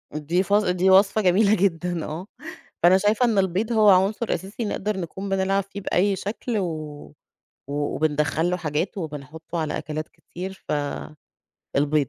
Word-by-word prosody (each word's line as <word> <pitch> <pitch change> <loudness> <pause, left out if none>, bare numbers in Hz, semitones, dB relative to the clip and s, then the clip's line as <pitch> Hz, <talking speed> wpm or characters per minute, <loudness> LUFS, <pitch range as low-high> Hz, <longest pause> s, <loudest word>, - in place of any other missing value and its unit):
دي 165 +5 0
فص 205 +2 +3
دي 180 0 +2
وصفة 195 +3 +5
جميلة 200 +3 +4
جدًا 175 -2 0
آه 165 +5 -6 0.6
فأنا 180 +2 +7
شايفة 210 +5 +2
إن 225 -4 +1
البيض 195 +4 +1
هو 215 -2 +5
عنصر 200 +4 +3
أساسي 200 +5 -4
نقدر 205 0 -2
نكون 190 +3 -5
بنلعب 195 +1 +1
فيه 200 +1 -9
بأي 195 +2 +1
شكل 215 +4 -3
و 195 - 0 1.0
و - - -5 0.2
وبندخّل 155 +2 +1
له 180 - 0
حاجاته 165 +4 -2
وبنحطه 160 +2 -6
على 155 -2 -2
أكلات 155 0 -5
كتير 190 +2 -9 1.1
فالبيض. 145 -1 +2
190 Hz, 150 wpm, -24 LUFS, 160-200 Hz, 1.1 s, فأنا